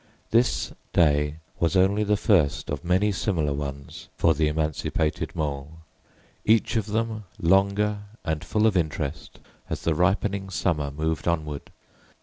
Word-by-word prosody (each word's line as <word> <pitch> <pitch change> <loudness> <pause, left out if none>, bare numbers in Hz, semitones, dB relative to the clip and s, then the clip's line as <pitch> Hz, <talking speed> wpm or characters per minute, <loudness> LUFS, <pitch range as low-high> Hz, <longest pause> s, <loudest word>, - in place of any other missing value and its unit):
This 120 +3 +2 0.2
day 75 -2 +3 0.2
was 85 +2 +1
only 95 +3 +4
the 105 0 +2
first 95 -10 +2
of - - -3
many 95 +4 +2
similar 85 -7 0
ones 70 -1 -6
for 80 - +4
the 75 +1 +1
emancipated 75 0 -1
Mole, 70 -1 -3 0.7
each 110 +2 +3
of 110 -2 0
them 110 0 -2
longer 100 +3 +2 0.3
and 80 -1 -1
full 110 0 +1
of 110 -3 +3
interest 80 -4 -2 0.3
as - - -4
the 80 - +2
ripening 95 +3 +1
summer 80 -6 0
moved 80 +4 -2
onward. 75 -4 -2
85 Hz, 135 wpm, -25 LUFS, 75-100 Hz, 0.7 s, only